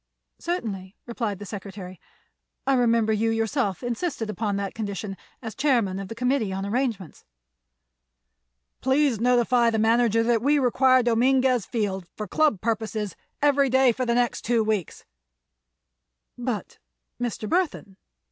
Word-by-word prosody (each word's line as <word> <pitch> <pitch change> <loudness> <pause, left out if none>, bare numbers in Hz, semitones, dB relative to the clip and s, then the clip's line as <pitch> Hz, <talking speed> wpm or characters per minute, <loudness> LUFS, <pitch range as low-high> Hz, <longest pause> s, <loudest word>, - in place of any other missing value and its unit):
"Certainly," 205 - -4
replied 230 -4 -3
the 205 - -8
secretary. 195 -2 -8 0.6
"I 275 - +3
remember 230 -3 +3
you 220 +1 +1
yourself 225 -2 -1
insisted 240 -2 -2
upon 210 0 -2
that 200 -1 -3
condition, 205 -2 -4 0.3
as 225 -1 -5
chairman 240 -9 +1
of 195 - -6
the 225 - -7
committee 250 -3 0
on 195 +1 -3
arrangements." 220 - -2 1.6
"Please 265 -3 +2
notify 240 0 +3
the 225 - 0
manager 230 0 +3
that 230 -1 +2
we 290 +4 +3
require 255 -1 +4
Dominguez 250 0 +2
Field, 195 -6 -2
for 210 - -4
Club 295 -2 +2
purposes, 220 -3 -2 0.3
every 280 -2 +4
day 260 0 +5
for 255 +3 -3
the 235 - +2
next 245 -1 +1
two 235 -1 +1
weeks." 215 -6 -2 1.3
"But—Mr. - - -6
Burthon! 320 - -1
230 Hz, 130 wpm, -25 LUFS, 205-250 Hz, 1.6 s, day